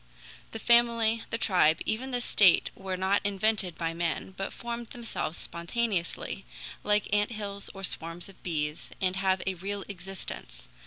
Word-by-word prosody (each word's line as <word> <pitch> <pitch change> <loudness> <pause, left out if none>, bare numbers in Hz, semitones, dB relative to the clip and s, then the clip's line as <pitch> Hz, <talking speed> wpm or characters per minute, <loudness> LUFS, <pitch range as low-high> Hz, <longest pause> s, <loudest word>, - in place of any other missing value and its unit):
The - - -5
family, 230 -1 +4
the 230 - 0
tribe, 175 -7 +4
even 235 +5 -1
the 245 -1 0
state 200 -6 +5
were 190 -1 -4
not 190 +2 +2
invented 200 -2 +1
by 165 -1 -1
men, 170 +2 -2
but 195 - -3
formed 235 0 -5
themselves 230 -9 -4
spontaneously, 180 +1 -2 0.4
like 210 0 +3
ant 205 +2 +3
hills 200 -2 -4
or 195 - -8
swarms 165 0 -2
of 195 - -15
bees, 150 -3 -2
and 185 -1 +1
have 190 -1 +2
a 190 - +1
real 195 +2 -4
existence. 195 -1 -7
195 Hz, 155 wpm, -29 LUFS, 180-220 Hz, 0.4 s, state